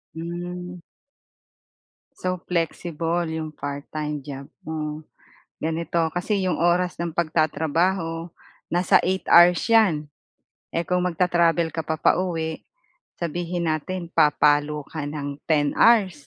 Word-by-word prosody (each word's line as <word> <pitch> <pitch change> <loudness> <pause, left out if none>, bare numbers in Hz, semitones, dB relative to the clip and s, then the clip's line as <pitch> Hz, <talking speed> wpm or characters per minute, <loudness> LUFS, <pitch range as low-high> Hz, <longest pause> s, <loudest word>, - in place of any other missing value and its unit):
Hmm. 175 +2 -6 1.4
So 185 0 -2
flexible 170 0 -1
'yong 160 -1 -4
part-time 145 0 -5
job 140 -1 -8 0.2
mo. 155 -1 -4 0.6
Ganito, 165 +1 -1 0.2
kasi 200 +3 0
'yong 180 - 0
oras 175 +2 +1
ng 170 -1 -3
pagtatrabaho 165 +1 0 0.4
nasa 175 +1 +4
8 190 +1 -1
hours 175 0 +7
'yan. 190 -10 +3 0.7
Eh, 170 - +1
kung 180 +2 0
mag-tra-travel 170 -1 +2
ka 160 -2 -5
pa 160 - 0
pauwi, 160 -1 0 0.5
sabihin 170 0 -2
natin 170 +3 -3
papalo 150 0 +3
ka 155 -3 -4
ng 145 -1 -5
10 145 -3 +2
hours 195 -11 +4
165 Hz, 110 wpm, -24 LUFS, 155-175 Hz, 1.4 s, hours